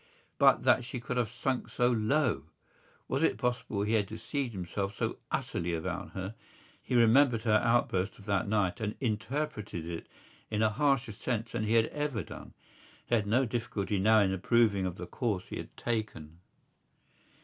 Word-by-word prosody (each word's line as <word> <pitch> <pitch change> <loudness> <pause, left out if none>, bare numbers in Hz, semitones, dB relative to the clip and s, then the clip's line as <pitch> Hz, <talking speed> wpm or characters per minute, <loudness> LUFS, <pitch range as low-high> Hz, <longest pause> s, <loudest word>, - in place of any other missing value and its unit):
But - - +5
that - - +4
she 125 +1 -5
could 125 +1 -4
have 120 -4 +1
sunk 130 +2 -2
so 120 0 +2
low! 115 - +1 0.6
Was 135 - -1
it 165 - +2
possible 120 -5 -1
he 105 +2 0
had 105 -3 +2
deceived 115 +5 -3
himself 100 +1 -3
so - - -2
utterly 85 0 -2
about 90 +3 -4
her? 95 +2 -4 0.5
He 125 - -2
remembered 120 0 +5
her 110 -2 +4
outburst 110 -5 +1
of 100 - -15
that 100 -2 0
night 105 0 0
and 105 -1 -2
interpreted 110 - -2
it 85 -1 -6 0.4
in 110 0 0
a 110 - +4
harsher 135 -1 +1
sense 115 +2 -3
than 110 - -2
he 110 +2 +2
had 115 -1 +5
ever 145 -9 -2
done. - - -11 0.5
He - - -4
had 110 -3 +2
no 125 +6 +3
difficulty 110 -4 -2
now 110 +2 +5
in 95 -1 +2
approving 100 0 +2
of 90 - -4
the - - -5
course 105 -7 -2
he - - -5
had - - -9
taken. 105 -9 -3
110 Hz, 175 wpm, -31 LUFS, 100-120 Hz, 0.6 s, But